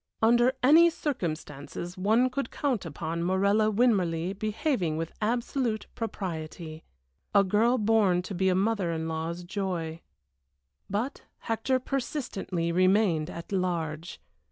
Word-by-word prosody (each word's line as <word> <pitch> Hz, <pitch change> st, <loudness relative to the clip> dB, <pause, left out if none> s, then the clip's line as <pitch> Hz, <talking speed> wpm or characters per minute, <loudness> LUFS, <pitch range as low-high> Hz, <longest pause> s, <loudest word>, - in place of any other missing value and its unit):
Under 240 Hz, +3 st, +4 dB
any 325 Hz, +6 st, +7 dB
circumstances 170 Hz, -, -4 dB
one 220 Hz, +7 st, +2 dB
could 265 Hz, -1 st, -2 dB
count 250 Hz, -, -1 dB
upon 165 Hz, +2 st, -4 dB
Morella 200 Hz, +4 st, +3 dB
Winmarleigh 190 Hz, -6 st, +2 dB
behaving 210 Hz, -, -1 dB
with 165 Hz, 0 st, -3 dB
absolute 235 Hz, 0 st, -1 dB
propriety. 165 Hz, -6 st, -5 dB, 0.5 s
A 200 Hz, -, +7 dB
girl 220 Hz, +6 st, +3 dB
born 210 Hz, -5 st, +3 dB
to 195 Hz, -, -6 dB
be 190 Hz, +1 st, +2 dB
a 185 Hz, -, +2 dB
mother 195 Hz, -2 st, +1 dB
in 160 Hz, 0 st, -2 dB
law's 165 Hz, +2 st, -3 dB
joy. 175 Hz, -4 st, -3 dB, 0.9 s
But 220 Hz, +7 st, -2 dB, 0.2 s
Hector 230 Hz, +3 st, 0 dB
persistently 240 Hz, -, -3 dB
remained 185 Hz, -3 st, +3 dB
at 170 Hz, +1 st, -8 dB
large. 170 Hz, -3 st, -2 dB
195 Hz, 120 wpm, -28 LUFS, 170-225 Hz, 0.9 s, any